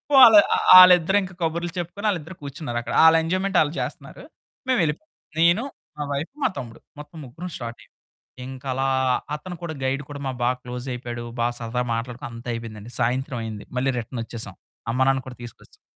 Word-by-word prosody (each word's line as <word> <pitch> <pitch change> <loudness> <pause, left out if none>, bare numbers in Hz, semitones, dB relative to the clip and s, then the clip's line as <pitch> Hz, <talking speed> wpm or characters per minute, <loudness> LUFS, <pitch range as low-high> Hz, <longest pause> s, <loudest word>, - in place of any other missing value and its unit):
వాళ్ 235 -5 +10 0.2
ఆ - - +1 0.2
ఆళ్ళిద్దరూ 180 +1 +7
ఇంకా 185 - -8
కబుర్లు 170 +1 -1
చెప్పుకొని 180 +5 -3
ఆళ్ళిద్దరూ 175 -1 -4
కూర్చున్నారక్కడ. 130 -4 -5
ఆళ్ళెంజాయ్‌మెంట్ 175 +4 +3
ఆళ్ళు 150 0 0
చేస్తున్నారు. - - -7 0.5
మేమెళ్ళిపోయాం. 200 - 0 0.3
నేను 170 +7 +4 0.4
మా 150 - -1
వైఫు, 145 - -4
మా - - +3
తమ్ముడు. 115 -2 -7 0.2
మొత్తం 150 +2 -11
ముగ్గురం 160 +9 -8
స్టార్టయ్యాం. 115 -1 -8 0.5
ఇంక 130 0 -9
అలా 135 +1 0 0.5
అతను 175 +4 -8
కూడా 170 -2 -4
గైడు 135 +2 -1
కూడా 145 - -7
మాకు 130 -2 -3
బాగా 125 +1 +2
క్లోజయిపోయాడు. 125 -1 -6 0.2
బా 120 - +2
సరదాగా 120 +1 -3
మాట్లాడుకున్నాం. 120 0 -5
అంతా 120 +1 -8
అయిపోయిందండి. 115 -1 -8
సాయంత్రం 130 +1 -1
అయింది. 110 -2 -7
మళ్ళీ 135 +2 +1
రిటర్న్ 115 +1 -6
వచ్చేసాం 110 -4 -7 0.4
అమ్మానాన్నను 130 +1 +1
కూడా 125 - -9
తీసుకొచ్చాం. 120 - -14
135 Hz, 160 wpm, -23 LUFS, 120-170 Hz, 0.5 s, వాళ్